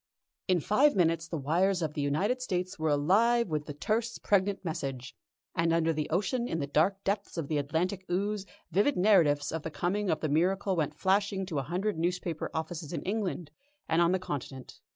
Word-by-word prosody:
In 180 -3 +2
five 270 - +3
minutes 165 -2 +2
the 165 - -3
wires 175 +6 +1
of 155 -1 -2
the 150 - -2
United 190 - 0
States 185 -4 -3
were 155 0 +1
alive 200 +10 +3
with 150 -2 -2
the 145 - -5
terse, 225 +8 -1
pregnant 200 -1 +1
message, 135 -5 -4 0.4
and 165 0 +1
under 165 0 +2
the 155 -1 -3
ocean 225 +8 0
in 165 - -2
the 140 - -1
dark 170 +8 +1
depths 200 -1 -2
of 160 -4 -2
the 150 -2 +1
Atlantic 170 +7 -1
ooze, 200 +2 -1 0.2
vivid 205 - +2
narratives 165 -8 +4
of 160 - -3
the 160 - -5
coming 190 +5 -1
of 155 - +1
the 155 - 0
miracle 185 +6 +1
went 150 -2 -1
flashing 195 +1 +1
to 165 -6 -2
a 135 +1 -6
hundred 185 +1 -1
newspaper 175 -1 -2
offices 160 -1 -4
in - - -3
England 190 -6 -2 0.4
and 165 +1 +2
on 170 0 +4
the 185 - +3
Continent. 140 -7 -6
175 Hz, 195 wpm, -30 LUFS, 155-195 Hz, 0.4 s, narratives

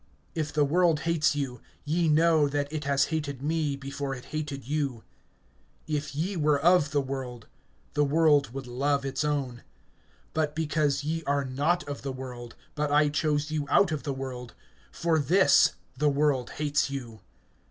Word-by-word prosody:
(18)If 155 -2 -2
the 150 -1 +3
world 165 0 +2
hates 165 -2 +1
you, 130 -5 -3 0.2
ye 165 +3 +1
know 155 -1 +4
that 145 +1 -2
it 150 -1 -3
has 140 -1 +3
hated 140 -4 -3
me 155 -2 0
before 140 0 -4
it 125 - -11
hated 145 -4 -4
you. 140 -6 -2 0.8
(19)If 150 -1 -3
ye 180 +7 -1
were 150 -3 +2
of 170 -1 +4
the 145 -1 +1
world, 130 -4 -6 0.5
the 145 - +2
world 145 -3 +3
would 135 +1 -6
love 140 +3 0
its 135 +3 -2
own; 135 -5 -2 0.7
but 155 -1 -1
because 150 -3 0
ye 165 +2 -2
are 140 0 +1
not 145 +6 0
of 145 -1 -5
the 135 - -4
world, 125 -2 -8 0.2
but 150 -1 -1
I 150 0 +4
chose 150 0 0
you 150 -2 -2
out 180 +4 +4
of 155 -3 -2
the 145 - -3
world, 130 -2 -6 0.4
for 165 -2 +1
this 185 +6 +5 0.2
the 150 +3 +2
world 140 -3 +1
hates 150 -1 +1
you. 120 -5 -6
145 Hz, 170 wpm, -28 LUFS, 135-155 Hz, 0.8 s, this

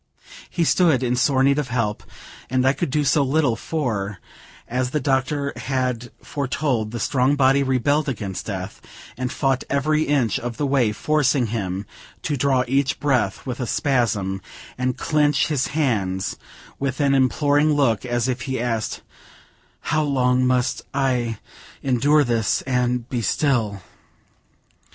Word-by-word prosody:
He 170 - 0
stood 160 -6 +3
in 125 0 +1
sore 130 +1 +2
need 140 +2 +3
of 145 - -2
help 115 -4 -1 0.5
and 130 0 +1
I 135 - +4
could 145 +3 -2
do 150 +3 +1
so 145 +1 +3
little; 140 -2 +2
for, 110 -10 -3 0.5
as 125 +1 -1
the 150 - -1
doctor 140 +1 0
had 125 -3 -2
foretold, 135 -5 -1
the 120 +1 -5
strong 130 +4 +2
body 135 0 +4
rebelled 140 +3 +1
against 100 -7 -5
death, 95 -1 -5 0.3
and 125 +2 -3
fought 135 -2 0
every 150 +2 +1
inch 135 -7 +1
of 120 -1 -5
the 145 - 0
way, 135 -5 +2
forcing 140 +2 +1
him 95 -2 -3 0.4
to 150 - -1
draw 135 -1 +2
each 135 +1 +1
breath 130 -9 0
with 125 -1 -4
a 125 - -2
spasm, 110 -9 0 0.3
and 125 0 -1
clench 150 -2 +2
his 145 -4 0
hands 95 -10 0 0.4
with 130 -2 -2
an 140 -1 +3
imploring 145 +3 +3
look, 135 -7 +2
as 120 -1 -1
if 130 0 -2
he 130 - -1
asked, 115 -2 -2 0.9
"How 155 - +3
long 130 -3 +2
must 125 0 +1
I 125 -5 0 0.5
endure 140 +4 +3
this, 115 -4 0
and 125 -2 0
be 125 -2 -2
still!" 110 - 0
130 Hz, 150 wpm, -22 LUFS, 120-140 Hz, 0.9 s, I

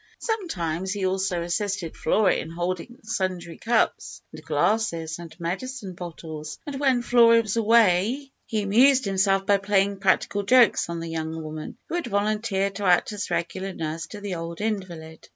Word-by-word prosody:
Sometimes 190 - -2
he 200 -2 -2
also 185 -2 0
assisted 180 -1 -2
Flora 195 +3 +2
in - - -3
holding 175 +7 -4
sundry 185 -5 -3
cups, 235 -1 0
and 155 0 -10
glasses, 170 0 0
and 165 0 -11
medicine 195 +4 -4
bottles, 160 -3 -7
and 280 -2 -5
when 260 -4 +2
Flora 230 -1 +5
was 215 -1 -3
away 230 +4 +3 0.2
he 215 -2 -1
amused 255 +6 +5
himself 195 0 +2
by 200 0 +4
playing 195 0 +1
practical 195 +1 +1
jokes 235 -2 +4
on 170 -1 -4
the 165 - -5
young 160 0 -4
woman 155 0 -7
who - - -7
had 345 0 -1
volunteered 205 -1 0
to 205 - -3
act 180 +4 +3
as 210 -1 -4
regular 190 +3 -2
nurse 165 0 -4
to 210 - -9
the 200 -2 -4
old 165 0 -5
invalid. 180 -7 -5
195 Hz, 165 wpm, -25 LUFS, 170-220 Hz, 0.2 s, Flora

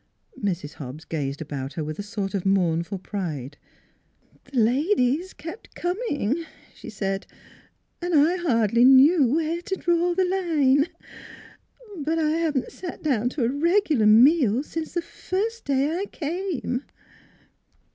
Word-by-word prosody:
Mrs. 175 -6 -2
Hobbs 145 +2 -9
gazed 145 -2 -3
about 140 -2 -6
her 160 - -3
with 155 +3 -6
a - - 0
sort 205 -1 -4
of 195 -3 -1
mournful 180 -1 +1
pride. 160 - -5 0.5
' - - -35
The 270 - -7
ladies 280 - +2
kep' 335 +7 -9
a - - -16
coming," 340 - -1 0.3
she - - -11
said, 195 -2 -3 0.4
" - - -41
an' 350 0 -2
I 310 +5 +4
hardly 235 - +2
knew 270 +3 +7
where 330 +1 -1
to 385 +1 -3
draw 345 -1 +1
the 375 0 +2
line. 315 -6 +2 1.1
But 315 +2 -1
I 310 -1 +1
haven't 315 -5 -1
sat 360 -2 -8
down 245 -6 +1
to 255 0 -3
a 230 - +2
regular 310 - +2
meal 250 +2 +5
since 320 +1 -6
the 345 - 0
first 435 +7 -4
day 280 +3 +1
I 385 +3 -2
came." 330 -6 -3
280 Hz, 145 wpm, -24 LUFS, 205-340 Hz, 1.1 s, knew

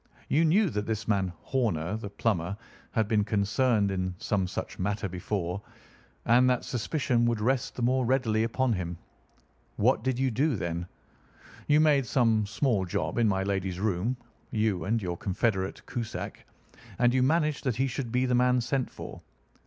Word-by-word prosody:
You 160 +4 +3
knew 185 +2 +3
that 105 0 -2
this 110 -1 -2
man 95 -4 +1
Horner, 105 -8 0
the 110 -2 -5
plumber, 100 -3 -1 0.3
had 110 -3 0
been 105 -1 +2
concerned 105 +1 +1
in 95 -1 -2
some 95 -1 0
such - - -5
matter 100 +2 -1
before, 90 0 -3 0.6
and 125 +2 +5
that 125 - +1
suspicion 125 0 0
would 115 -2 0
rest 130 +4 0
the 125 - -3
more 130 +2 +2
readily 120 -3 +2
upon 120 +2 +1
him. 90 -3 -3 0.8
What - - +2
did 130 -1 0
you 130 0 +1
do, 135 +5 +1
then? 85 -2 -3 0.8
You 150 +1 +5
made 145 -5 +4
some 110 -4 +2
small 105 -1 +1
job 85 +1 -2
in 115 - +4
my 95 -2 +1
lady's 95 -2 -2
room—you 110 -1 -2
and 115 +4 +1
your 90 -4 -3
confederate 95 0 -1
Cusack—and 120 +1 -4
you 130 - +3
managed 150 +2 +2
that 125 -4 +1
he 130 +3 +1
should 130 -2 -3
be 125 +2 +2
the 125 - +1
man 125 0 +4
sent 125 +2 -1
for. - - -9
110 Hz, 165 wpm, -28 LUFS, 100-125 Hz, 0.8 s, and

